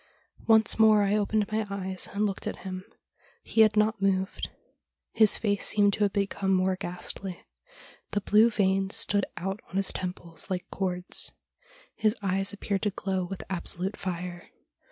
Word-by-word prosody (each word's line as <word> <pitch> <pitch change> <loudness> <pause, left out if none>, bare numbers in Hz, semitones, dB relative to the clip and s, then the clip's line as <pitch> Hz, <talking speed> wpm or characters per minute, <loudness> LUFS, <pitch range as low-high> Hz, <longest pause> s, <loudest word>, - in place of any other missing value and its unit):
Once 220 -1 +5
more 215 -1 +6
I 200 +1 +1
opened 210 0 0
my 215 0 -1
eyes 190 -1 -4
and 205 +1 0
looked 195 -2 -3
at - - -6
him. 185 -1 -5 0.6
He 225 - +2
had 215 -1 +5
not 215 0 +2
moved. 190 -1 0 0.6
His 220 -2 +5
face 205 -2 0
seemed 205 -1 +4
to - - -3
have 200 - -2
become 200 -1 -1
more 185 0 +2
ghastly. 180 0 -6 0.6
The 205 - -1
blue 215 +4 +5
veins 195 -2 +1
stood 205 -1 +2
out 195 +3 -3
on - - -10
his 195 -1 +2
temples 180 -2 -5
like 180 -1 -3
cords. 180 -2 -1 0.6
His 215 0 +1
eyes 195 -1 0
appeared 200 -1 -3
to 210 - +1
glow 190 -2 -2
with 195 +1 -7
absolute 190 +1 -1
fire. 175 -1 -6
195 Hz, 160 wpm, -27 LUFS, 185-210 Hz, 0.6 s, more